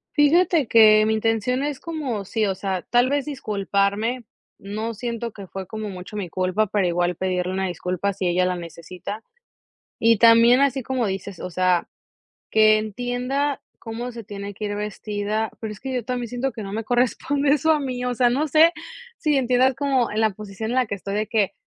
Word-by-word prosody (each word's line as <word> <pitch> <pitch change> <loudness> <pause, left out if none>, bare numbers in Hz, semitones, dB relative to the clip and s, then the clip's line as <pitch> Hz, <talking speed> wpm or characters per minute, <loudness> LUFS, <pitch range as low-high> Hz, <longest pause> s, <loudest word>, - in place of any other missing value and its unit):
Fíjate 320 -1 +4
que, 215 -2 +7
mi 220 - +2
intención 225 +4 0
es 290 -2 -3
como 285 -11 -4
sí, 215 +2 -1
o 195 - 0
sea, 190 -1 -3
tal 245 +1 +4
vez 285 -1 0
disculparme. 215 -2 -1 0.3
No 215 +3 -4
siento 235 0 -4
que 200 -2 -10
fue 190 +1 -6
como 215 +2 -6
mucho 185 +2 -9
mi 195 -5 -4
culpa, 185 +5 0
pero 200 -1 0
igual 175 0 0
pedirle 185 0 -1
una 190 0 -1
disculpa 180 +3 -2
si 190 -1 -2
ella 180 +1 +2
la 180 0 0
necesita. 175 +5 -8 0.8
Y 230 -2 +4
también 230 +2 +6
así 275 -2 +2
como 255 -2 -1
dices, 195 -1 -5
o 180 - -4
sea, 180 0 +1 0.6
que 215 0 +5
entienda 245 +6 -2 0.2
cómo 235 +2 -6
se 230 -1 -8
tiene 200 0 -7
que 210 +2 -5
ir 205 - -3
vestida. 210 +1 -3
Pero 220 -2 -4
es 210 - -12
que 265 0 -4
yo 245 -3 -2
también 245 -1 -3
siento 250 +3 -2
que 220 - -7
no 195 +1 -6
me 225 0 -3
corresponde 270 +4 +1
eso 315 +3 +3
a 300 - +1
mí, 250 -2 -3
o 250 - 0
sea, 245 0 +3
no 275 +6 +1
sé 320 +4 +5 0.4
si 300 -2 0
entiendas 255 0 +3
como 270 -3 +1
en 215 +1 -1
la 220 -1 +3
posición 215 +2 -6
en - - -1
la 255 -1 +3
que 205 - -4
estoy 195 +1 -5
de 215 +1 0
que, 210 -2 +1
220 Hz, 200 wpm, -23 LUFS, 200-250 Hz, 0.8 s, que